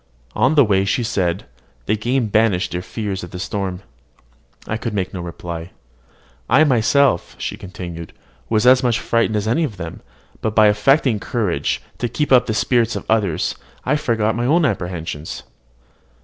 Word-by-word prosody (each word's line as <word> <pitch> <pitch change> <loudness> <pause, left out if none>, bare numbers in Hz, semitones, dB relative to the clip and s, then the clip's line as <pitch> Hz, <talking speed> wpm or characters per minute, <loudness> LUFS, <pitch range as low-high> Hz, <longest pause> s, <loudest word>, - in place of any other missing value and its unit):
On 135 +5 +3
the 145 -4 +6
way 95 -2 +2
she 100 +5 0
said, 95 -5 -1 0.4
"The 110 - +1
game 120 +4 0
banished 105 -3 +2
their 90 - -2
fears 100 0 -4
of 90 - -7
the 90 - -7
storm." 95 -1 -3 0.8
I 110 - -2
could 110 -1 -4
make 95 -2 -2
no 90 - -4
reply. 85 0 -7 0.8
"I 135 +6 +6
myself," 130 - +2
she - - -4
continued, 85 -3 -8 0.4
"was 110 0 +2
as 130 0 +7
much 120 -3 +1
frightened 115 -2 +1
as 105 0 -1
any 150 +9 +2
of 115 -10 -3
them; 85 -2 -7 0.4
but 110 -1 -2
by 110 - +6
affecting 105 +3 +3
courage, 95 - -1 0.2
to 120 - -1
keep 150 +2 -2
up 125 -1 +6
the 110 - -1
spirits 120 -1 +2
of - - -5
the - - +3
others, 100 -8 0 0.3
I 135 - +2
forgot 110 -6 0
my 120 +1 -1 0.2
apprehensions." 90 - -4
110 Hz, 170 wpm, -20 LUFS, 90-120 Hz, 0.8 s, as